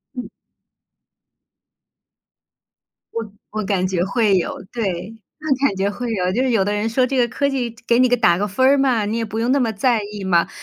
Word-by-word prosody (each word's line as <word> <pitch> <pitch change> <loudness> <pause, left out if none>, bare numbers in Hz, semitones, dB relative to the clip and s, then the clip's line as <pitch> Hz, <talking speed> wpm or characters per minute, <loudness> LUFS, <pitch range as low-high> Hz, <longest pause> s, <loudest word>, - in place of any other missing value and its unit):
嗯。 250 - -6 2.8
我 225 -3 -4 0.2
我 215 0 -3
感 190 -2 0
觉 180 -2 0
会 200 0 +2
有， 175 - -3
对， 210 -1 -4 0.2
我 280 -3 +1
感 200 - -3
觉 195 +1 0
会 235 +3 -4
有。 185 -3 0
就 235 - 0
是 260 - +1
有 220 -5 +3
的 205 +2 -1
人 210 +2 -1
说 250 +3 +2
这 265 +1 -2
个 245 -1 +3
科 280 +4 -1
技 245 -4 -3
给 235 - +4
你 255 - +5
个 245 - +3
打 175 -7 +3
个 205 - -1
分 235 +6 +1
儿 275 +2 +5
嘛， 250 -6 +2
你 220 +3 -2
也 230 - -1
不 220 +1 -4
用 235 +2 +1
那 280 - +3
么 235 -4 +1
在 230 +2 +1
意 205 -2 -6
嘛， 175 -3 +2
225 Hz, 225 characters per minute, -20 LUFS, 200-250 Hz, 2.8 s, 你